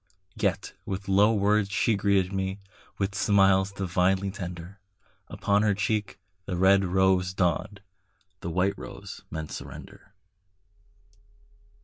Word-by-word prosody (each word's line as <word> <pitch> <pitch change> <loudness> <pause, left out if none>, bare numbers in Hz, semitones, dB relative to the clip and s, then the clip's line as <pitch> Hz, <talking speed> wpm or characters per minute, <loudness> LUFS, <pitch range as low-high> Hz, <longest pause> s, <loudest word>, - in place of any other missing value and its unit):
Yet - - -1
with 95 0 -5
low 100 +3 +5
words 105 -1 +2
she 100 +4 +1
greeted 100 -2 +1
me, 95 0 -2 0.4
With 100 0 -1
smiles 95 -1 +3
divinely 95 0 0
tender; 90 +1 -8 0.5
Upon 100 0 +1
her 105 -2 +2
cheek 105 +1 -1 0.3
the 90 -3 -2
red 95 +2 +5
rose 95 0 +2
dawned, 95 +3 -1 0.6
The 85 - -5
white 90 +4 0
rose 100 0 -9
meant 80 -1 -6
surrender. 100 - -10
95 Hz, 115 wpm, -27 LUFS, 95-100 Hz, 0.6 s, low